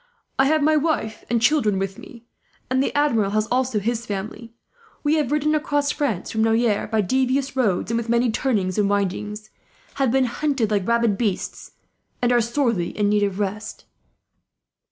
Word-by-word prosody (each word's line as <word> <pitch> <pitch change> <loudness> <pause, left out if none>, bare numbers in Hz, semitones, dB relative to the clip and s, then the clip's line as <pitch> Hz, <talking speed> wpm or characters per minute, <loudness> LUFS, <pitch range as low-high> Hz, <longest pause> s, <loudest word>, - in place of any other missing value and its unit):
I 270 - +5
have 310 0 +2
my 310 +1 +4
wife 295 -8 -1
and 235 0 +2
children 235 -5 +2
with 195 0 -3
me, 235 -1 -13 0.5
and 260 0 +3
the - - 0
Admiral 230 -9 +2
has 215 +1 +1
also 255 -2 +1
his 230 +3 -1
family. 215 +2 -6 0.5
We 300 +1 +2
have 295 -4 0
ridden 300 +1 +1
across 290 -2 0
France, 250 - -2
from 220 0 0
Noyers, 225 -2 +1
by 220 -1 +2
devious 260 +5 0
roads 220 -5 0
and 230 - +1
with 235 0 -6
many 235 0 +2
turnings 210 -6 0
and 200 -1 +2
windings; 210 +2 -2 0.5
have 265 - +3
been 265 +2 +3
hunted 250 -3 -1
like 200 -3 0
rabid 235 -3 +2
beasts, 210 -6 -3 0.5
and 245 0 +1
are 240 -1 +4
sorely 230 -7 -1
in 205 -1 +2
need 210 0 +2
of 200 -2 0
rest." 210 +1 -4
230 Hz, 175 wpm, -22 LUFS, 210-265 Hz, 0.5 s, I